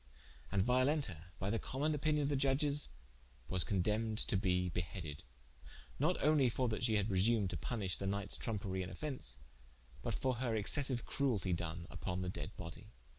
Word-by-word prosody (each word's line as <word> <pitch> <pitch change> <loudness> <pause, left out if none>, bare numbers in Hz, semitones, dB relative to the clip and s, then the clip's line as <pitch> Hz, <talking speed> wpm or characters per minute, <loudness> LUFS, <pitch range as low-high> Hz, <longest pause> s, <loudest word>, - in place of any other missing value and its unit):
And 95 -1 +3
Violenta 125 - +2
by 100 +1 -1
the 115 - 0
common 145 +4 0
opinion 150 0 +1
of 140 - +1
the 145 - +1
Judges 140 +2 +3 0.6
was 90 +3 +4
condempned 105 +2 0
to - - +2
be 90 -2 +2
beheaded: 85 -3 -4 0.8
not 160 +6 +2
only 145 -4 +5
for 125 +2 0
that 110 - -2
she 115 -3 +3
had 105 -1 +2
presumed 100 0 +3
to - - -2
punishe 100 -7 -2
the 95 - -2
knightes 100 0 0
tromperie 100 -4 -2
and 90 0 -5
offence, 135 +8 -3 0.6
but - - -1
for 130 -2 0
her 120 -2 0
excessiue 125 +3 +2
crueltie 110 -10 +1
doen 85 0 -4
vpon 90 -1 -3
the 90 - -2
dead - - -4
body. 85 -2 -8
110 Hz, 175 wpm, -36 LUFS, 95-135 Hz, 0.8 s, only